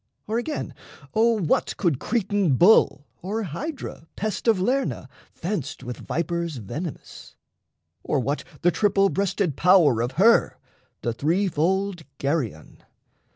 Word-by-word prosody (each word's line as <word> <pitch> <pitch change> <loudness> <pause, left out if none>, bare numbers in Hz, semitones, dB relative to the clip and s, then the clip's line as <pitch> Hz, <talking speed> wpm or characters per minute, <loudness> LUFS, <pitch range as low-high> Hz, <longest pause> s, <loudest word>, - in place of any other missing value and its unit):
Or, 220 +2 -1
again, 300 +5 -4 0.4
O 230 +1 +3
what 165 -6 0
could 165 -9 +1
Cretan 205 - +1
Bull, 175 - +5 0.2
or 210 +5 -3
Hydra, 195 - -6
pest 215 +3 -3
Of 220 -4 +4
Lerna, 255 +8 -1 0.2
fenced 165 - -4
with 125 -1 -6
vipers 170 0 -2
venomous? 135 - -7 0.7
Or 145 - 0
what 140 +4 -2 0.2
the 175 - +5
triple 195 -1 +2
breasted 195 -5 -1
power 165 -10 +5
of 120 +2 -2
her 215 - +4 0.5
The 120 - -1
three 165 - +1
fold 190 +3 0 0.2
Geryon... 135 - -3
180 Hz, 125 wpm, -24 LUFS, 145-205 Hz, 0.7 s, Bull